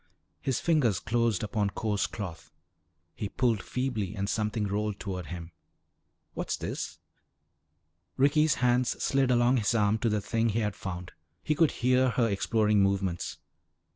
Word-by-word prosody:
His 130 -3 0
fingers 145 - +2
closed 115 -3 0
upon 105 -1 0
coarse 105 0 -1
cloth. 90 -6 -7 0.6
He 100 +5 -4
pulled 115 -4 +1
feebly 125 -7 -2
and 100 -1 -2
something 105 0 -1
rolled 105 0 -2
toward 90 -4 -5
him. 85 -1 -7 0.8
"What's - - -2
this?" - - -5 1.2
Ricky's 145 +2 +4
hands 125 0 +2
slid 135 -1 +2
along 120 +1 +4
his 115 +1 +1
arm 105 0 +2
to 115 - +1
the 105 0 +1
thing 115 +3 0
he 115 +2 0
had 105 -2 -1
found. 90 -2 -6 0.3
He 155 - +1
could 155 0 +4
hear 125 +1 +2
her 120 -1 +2
exploring 105 0 +2
movements. 95 -3 0
110 Hz, 145 wpm, -29 LUFS, 100-125 Hz, 1.2 s, Ricky's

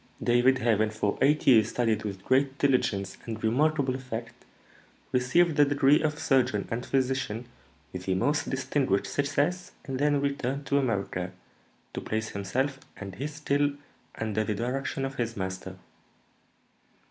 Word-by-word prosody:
David, 120 +2 +4
having 110 -3 +2
for 105 -1 -1
eight 150 +2 +3
years 110 -4 +6
studied 115 -3 0
with 100 -3 -5
great 135 +3 +2
diligence 110 -9 +1
and 110 -1 -5
remarkable 140 +3 +2
effect, 125 -3 -6 0.8
received 150 +6 +3
the 145 - +7
degree 145 0 +4
of 150 -1 0
surgeon 130 -8 +1
and 115 +2 -2
physician 130 -4 -1 0.5
with 90 0 -6
the 95 - +1
most 145 +10 0
distinguished 130 -6 0
success, 145 - -1
and 130 -2 -4
then 145 0 +3
returned 140 0 -2
to 140 +1 +2
America 100 -7 -2 0.6
to - - -4
place 110 0 -2
himself 130 +8 -2 0.2
and 100 -2 -7
his 145 +8 -5
skill 145 -1 +1 0.4
under 110 -1 -1
the 105 0 -2
direction 135 +4 -2
of 135 0 -6
his 115 -2 -2
master." 95 0 -5
130 Hz, 145 wpm, -28 LUFS, 110-140 Hz, 0.8 s, the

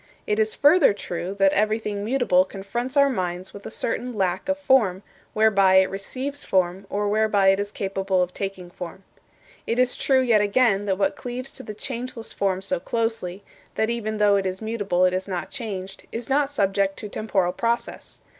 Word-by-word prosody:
It 210 +1 0
is 220 0 +1
further 290 - +5
true 185 -1 -5
that 195 -1 +3
everything 215 -1 0
mutable 225 -6 +3
confronts 235 +8 -5
our 280 0 +6
minds 185 -7 -3
with 200 - -9
a - - -5
certain 240 +2 -3
lack 190 +4 -1
of 285 - +1
form, 220 -10 +2 0.3
whereby 200 -3 +4
it 190 0 +5
receives 260 +9 -4
form, 185 +1 0
or 205 +1 -1
whereby 205 -2 +3
it 195 0 +3
is 205 0 -3
capable 195 -1 -1
of 180 0 -5
taking 190 -3 -5
form. 180 +2 -8 0.6
It 230 - 0
is 250 0 +3
true, 265 -1 +3
yet 235 -5 +4
again, 205 -1 +2
that 190 -2 0
what 195 0 +1
cleaves 250 +2 -6
to - - -9
the 215 -4 -8
changeless 240 0 -5
form 190 -1 -1
so 185 -2 -1
closely 225 -2 -2 0.3
that 220 +1 +1
even 215 -2 -3
though 205 -1 +4
it 195 -1 0
is 185 0 -4
mutable 205 -5 0
it 185 - +2
is 185 +1 -2
not 180 -4 -4
changed 195 -6 -6
is 230 0 -5
not 280 +1 +2
subject 195 -6 0
to 210 - -5
temporal 195 -4 -1
process. 235 0 -3
205 Hz, 190 wpm, -24 LUFS, 190-235 Hz, 0.6 s, our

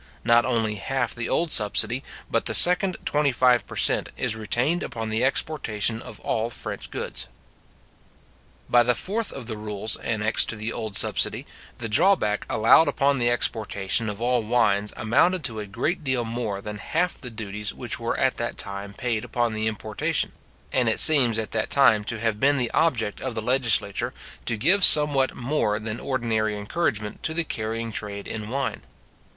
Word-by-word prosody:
Not 120 +1 +3
only 110 -4 -1
half 130 +3 -2
the 120 -1 -5
old 165 -2 0
subsidy, 115 +4 +3 0.2
but - - -1
the - - -1
second 180 +1 +6
twenty 150 -1 +1
five 125 -1 +2
per - - -10
cent. - - +3
is - - -1
retained 120 - -1
upon 115 -1 -5
the 110 +2 0
exportation 120 -6 -1
of - - -11
all 115 +1 -2
French - - -7
goods. - - -4 1.4
By 120 - +4
the 120 0 +1
fourth 215 - -3
of 135 - -8
the 110 -2 -6
rules 105 0 -1
annexed 110 0 0
to - - -3
the 110 +2 -4
old 110 -3 -1
subsidy, - - +2 0.3
the 115 - -4
drawback 115 - +2
allowed 115 +8 +4
upon 140 -1 +1
the 120 0 +2
exportation 110 -2 -1
of 105 0 -6
all 120 +1 +1
wines 105 -3 +1
amounted 150 +10 +1
to 115 -5 -2
a 105 - -6
great 140 - -3
deal 130 -4 -1
more 115 -4 -4
than 105 0 -7
half 180 +9 -2
the 125 - -7
duties 105 -2 -5
which - - -5
were - - -3
at - - 0
that - - -4
time 100 0 -4
paid 115 -3 -2
upon 120 -2 -2
their 110 0 -2
importation; 110 -1 -2 0.4
and 125 -3 +2
it 110 - +1
seems 130 -8 +6
at 110 -1 -4
that 110 - -2
time 125 -7 +4
to 115 0 -4
have 110 -2 -1
been 140 +3 +3
the 120 -3 0
object 130 -10 0
of 130 -3 -4
the - - -2
legislature 120 -2 +1 0.3
to 115 - -1
give 190 - +2
somewhat 145 -5 +6
more 120 -5 -1
than 110 +1 -5
ordinary 110 -5 -2
encouragement 105 -2 -3
to 160 - -2
the 170 - 0
carrying 115 -4 -4
trade 100 -1 -5
in 110 0 -6
wine. 140 +3 -3
115 Hz, 180 wpm, -24 LUFS, 110-130 Hz, 1.4 s, second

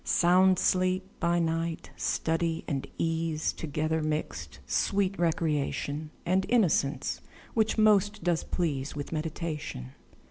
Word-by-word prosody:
Sound 185 +1 +4
sleep 185 +1 +1
by 170 0 +2
night; 165 0 -1
study 165 0 -1
and 135 -2 -2
ease 165 -1 0
Together 155 +1 -1
mixed; 155 0 -3
sweet 195 -1 +1
recreation, 155 -2 -1 0.2
And 185 +2 +2
innocence, 155 - +1 0.3
which 220 0 +1
most 210 -1 +3
does 175 -2 +1
please 150 -6 -2
With 145 -1 -5
meditation. 155 - -4
165 Hz, 110 wpm, -29 LUFS, 155-185 Hz, 0.3 s, Sound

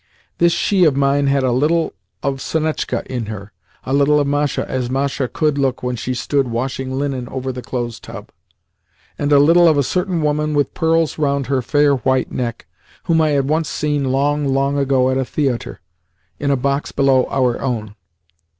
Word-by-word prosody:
This 170 0 +4
she 190 +2 +2
of 150 -4 +3
mine 140 +1 +2
had 140 -1 +2
a 130 - +2
little 155 +6 +1 0.3
of 135 -1 -2
Sonetchka 155 -1 -2
in 120 -4 -4
her, 105 -1 -7 0.3
a 130 - -2
little 145 +1 +4
of 145 - +1
Masha 145 0 -1
as 125 -2 -2
Masha 135 0 -1
could 150 +2 0
look 135 -2 0
when 125 0 -1
she 125 +2 -3
stood 140 +1 0
washing 130 +2 -3
linen 135 -3 -3
over 130 0 -4
the 125 0 -7
clothes 120 -2 -4
tub, - - -10 0.9
and 145 0 0
a 145 - +7
little 165 +5 +6
of 155 -3 +4
a 140 - +3
certain 180 +2 -1
woman 150 0 0
with 145 -1 +1
pearls 165 -1 +1
round 140 -2 0
her 135 0 0
fair 145 +2 +2
white 130 0 0
neck 120 -2 -4 0.4
whom 165 -1 +2
I 155 - +2
had 140 -2 +1
once 155 0 0
seen 145 -1 -1
long, 145 +2 +1
long 135 +1 +1
ago 135 -2 +2
at 130 - 0
a - - +1
theatre, 130 -2 -2 0.6
in 140 - -1
a 140 - +2
box 140 +2 -1
below 135 -2 +3
our 125 -3 0
own. 110 -5 -3
140 Hz, 190 wpm, -19 LUFS, 130-150 Hz, 0.9 s, a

